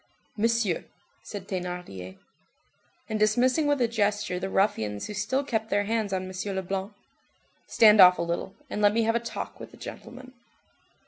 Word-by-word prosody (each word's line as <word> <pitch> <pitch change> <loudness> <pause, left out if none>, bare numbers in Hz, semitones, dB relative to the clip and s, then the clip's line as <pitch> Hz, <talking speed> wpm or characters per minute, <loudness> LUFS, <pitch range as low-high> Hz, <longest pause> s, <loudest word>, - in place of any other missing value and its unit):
"Monsieur—" 225 -4 +1 0.4
said 200 -2 -8
Thénardier. 180 - -6 0.9
And 215 - -2
dismissing 250 +8 +3
with 290 -1 +2
a 240 - +4
gesture 210 -4 0
the 190 +1 -3
ruffians 110 - 0
who 210 - -6
still 220 +7 -1
kept 225 -5 -2
their 205 -1 +2
hands 220 -1 -1
on 185 -1 -2
M. 190 +1 -4
Leblanc:— 190 +2 -3 0.7
"Stand 215 -2 +6
off 180 0 +8
a - - -1
little, 170 +3 -3
and 210 - -4
let 205 +1 +4
me 230 - +3
have 225 +1 +1
a - - +3
talk 235 0 -6
with - - -9
the - - -16
gentleman." 255 +1 -10
205 Hz, 170 wpm, -27 LUFS, 185-230 Hz, 0.9 s, off